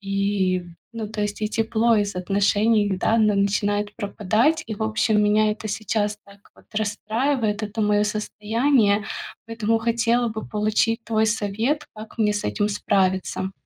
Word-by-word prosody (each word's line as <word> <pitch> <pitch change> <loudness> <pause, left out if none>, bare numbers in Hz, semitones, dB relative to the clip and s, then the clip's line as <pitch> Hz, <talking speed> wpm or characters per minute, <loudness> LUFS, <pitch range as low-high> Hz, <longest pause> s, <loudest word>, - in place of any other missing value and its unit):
И, 195 -2 0 0.3
ну, 225 -2 -5
то 215 0 -5
есть, 205 +1 -3
и 210 - +1
тепло 225 +1 +2
из 205 -2 0
отношений, 205 +3 +2
да, 220 +4 +1
н 220 -2 +4 0.2
начинает 205 +1 0
пропадать. 220 - +1
И, 220 - -4
в 220 - -4
общем, 215 -1 +2
меня 210 +1 +3
это 215 +1 -5
сейчас 210 0 -1
так 200 0 -17 0.2
вот - - -22
расстраивает, 220 +2 -1
это 215 +2 -5
моё 210 0 +2
состояние, 215 +1 +1 0.4
поэтому 225 0 0
хотела 235 +1 +1
бы 220 0 -6
получить 215 +2 +1
твой 220 -1 +1
совет, 220 +7 -1
как 215 0 -11
мне 210 -2 +2
с 205 - -3
этим 205 -1 0
справиться. 190 -2 0
210 Hz, 155 wpm, -23 LUFS, 205-225 Hz, 0.4 s, н